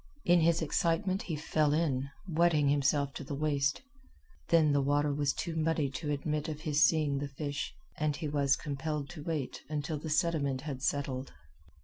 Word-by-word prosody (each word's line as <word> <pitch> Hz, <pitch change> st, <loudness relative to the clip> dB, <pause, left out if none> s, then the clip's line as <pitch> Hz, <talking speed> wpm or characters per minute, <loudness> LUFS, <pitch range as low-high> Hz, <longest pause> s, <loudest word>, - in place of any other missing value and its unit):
In 175 Hz, 0 st, +5 dB
his 165 Hz, 0 st, +3 dB
excitement 175 Hz, +5 st, +1 dB
he 165 Hz, -, -3 dB
fell 150 Hz, 0 st, +1 dB
in, 140 Hz, -4 st, 0 dB, 0.2 s
wetting 160 Hz, -4 st, +3 dB
himself 140 Hz, 0 st, +2 dB
to -, -, -6 dB
the 140 Hz, -, -5 dB
waist. 145 Hz, -, 0 dB, 0.7 s
Then 160 Hz, -3 st, +5 dB
the 140 Hz, -, +3 dB
water 145 Hz, +1 st, +2 dB
was 145 Hz, -1 st, +1 dB
too 170 Hz, -, -4 dB
muddy 160 Hz, -3 st, +1 dB
to 145 Hz, +3 st, -4 dB
admit 150 Hz, +2 st, -1 dB
of 155 Hz, -1 st, -5 dB
his 150 Hz, -2 st, +2 dB
seeing 150 Hz, -4 st, +3 dB
the 145 Hz, -, -3 dB
fish, 145 Hz, +1 st, -4 dB, 0.3 s
and 150 Hz, -1 st, +1 dB
he 155 Hz, -, -4 dB
was 140 Hz, -1 st, +2 dB
compelled 145 Hz, 0 st, -4 dB
to 160 Hz, -4 st, -8 dB
wait 155 Hz, -5 st, -3 dB
until 150 Hz, 0 st, -2 dB
the 160 Hz, -, -6 dB
sediment 150 Hz, -5 st, +1 dB
had 140 Hz, -3 st, -5 dB
settled. 135 Hz, -1 st, -2 dB
150 Hz, 175 wpm, -31 LUFS, 140-160 Hz, 0.7 s, In